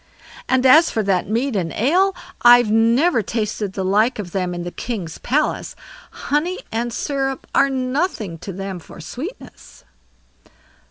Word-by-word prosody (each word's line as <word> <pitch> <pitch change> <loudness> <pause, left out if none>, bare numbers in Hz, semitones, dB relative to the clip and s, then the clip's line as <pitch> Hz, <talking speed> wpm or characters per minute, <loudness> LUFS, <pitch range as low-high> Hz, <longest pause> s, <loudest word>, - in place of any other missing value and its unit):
"And 260 0 +2
as 310 +6 +7
for 220 - -1
that 190 -2 0
mead 235 +3 0
and 170 -4 -1
ale, 365 - +2 0.3
I've 240 -2 +6
never 230 +6 +3
tasted 210 -2 -3
the 190 -1 -3
like 215 +6 +2
of 195 -5 -6
them 180 -2 -2
in 175 - -4
the 175 - -5
king's 190 -9 -5
palace; 295 +5 -1 0.3
honey 330 +6 -2
and 235 +2 -2
syrup 270 +1 -2
are 275 - +4
nothing 255 - -2
to 195 - -7
them 190 0 -6
for 170 - -14
sweetness." 270 - -9
230 Hz, 150 wpm, -20 LUFS, 195-270 Hz, 0.3 s, as